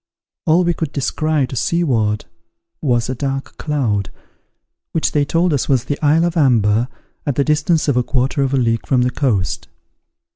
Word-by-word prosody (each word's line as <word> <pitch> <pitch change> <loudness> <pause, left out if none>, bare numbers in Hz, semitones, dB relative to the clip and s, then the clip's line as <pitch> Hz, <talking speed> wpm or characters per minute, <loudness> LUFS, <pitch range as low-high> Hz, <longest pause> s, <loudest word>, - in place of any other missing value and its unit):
All 165 +3 +4
we 175 0 +2
could 160 -3 -4
descry 150 +1 0
to 130 - -7
seaward 115 -10 0 0.6
was 120 -5 +1
a 130 - -2
dark 135 +1 -4
cloud, 120 -10 -1 0.8
which 160 - +1
they 145 - +2
told 165 +3 +1
us 140 - -1
was 130 -4 +3
the 145 - -3
isle 155 +3 +4
of 175 0 -1
Amber, 120 - +3 0.4
at 145 - -1
the 140 - +2
distance 155 +2 +1
of 140 - +2
a 125 - +3
quarter 130 +2 0
of 135 -1 +1
a 135 - +1
league 115 -3 0
from 125 -2 +3
the 125 - +1
coast. 100 - -1
135 Hz, 180 wpm, -18 LUFS, 120-155 Hz, 0.8 s, All